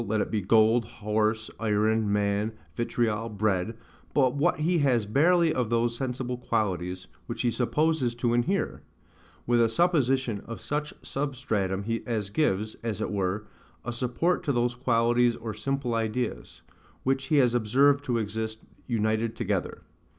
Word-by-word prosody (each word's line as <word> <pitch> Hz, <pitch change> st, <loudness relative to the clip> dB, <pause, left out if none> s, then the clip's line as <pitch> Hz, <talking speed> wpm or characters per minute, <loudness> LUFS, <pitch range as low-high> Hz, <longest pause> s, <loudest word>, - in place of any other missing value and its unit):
let 110 Hz, +1 st, +1 dB
it -, -, -1 dB
be 110 Hz, -2 st, 0 dB
gold, 110 Hz, +4 st, +4 dB
horse, 110 Hz, +1 st, -1 dB
iron, 110 Hz, 0 st, +1 dB
man, 105 Hz, +1 st, +1 dB, 0.2 s
vitriol, 115 Hz, -1 st, -1 dB
bread, 105 Hz, 0 st, -1 dB, 0.4 s
but 130 Hz, -3 st, +4 dB
what 155 Hz, +1 st, +1 dB
he 170 Hz, +2 st, +2 dB
has 125 Hz, -7 st, +2 dB
barely 165 Hz, -, +3 dB
of 125 Hz, -4 st, -1 dB
those 115 Hz, 0 st, +1 dB
sensible 125 Hz, -1 st, -3 dB
qualities, 90 Hz, -6 st, -2 dB, 0.2 s
which 115 Hz, 0 st, -3 dB
he 120 Hz, -, +2 dB
supposes 130 Hz, 0 st, +1 dB
to 120 Hz, 0 st, 0 dB
inhere; 170 Hz, +12 st, 0 dB, 0.6 s
with 120 Hz, 0 st, +3 dB
a 115 Hz, -, +4 dB
supposition 130 Hz, -, +1 dB
of 115 Hz, -, -6 dB
such 150 Hz, 0 st, -3 dB
a -, -, -17 dB
substratum 110 Hz, -9 st, -2 dB, 0.2 s
as 105 Hz, -4 st, -2 dB
gives, 110 Hz, -5 st, 0 dB
as 110 Hz, -3 st, -3 dB
it 110 Hz, -, -2 dB
were, 100 Hz, +1 st, -1 dB, 0.4 s
a 120 Hz, -, -3 dB
support 125 Hz, +9 st, 0 dB
to 160 Hz, -5 st, -1 dB
those 120 Hz, -1 st, +1 dB
qualities 120 Hz, -1 st, +2 dB
or 115 Hz, -1 st, -5 dB
simple 130 Hz, +3 st, -2 dB
ideas, 115 Hz, +2 st, -3 dB, 0.4 s
which 135 Hz, +1 st, 0 dB
he 150 Hz, -, +1 dB
has 125 Hz, -4 st, +4 dB
observed 135 Hz, +5 st, +3 dB
to 125 Hz, -4 st, 0 dB
exist 110 Hz, 0 st, -3 dB, 0.2 s
united 110 Hz, -1 st, 0 dB
together. -, -, -2 dB
115 Hz, 150 wpm, -27 LUFS, 110-130 Hz, 0.6 s, gold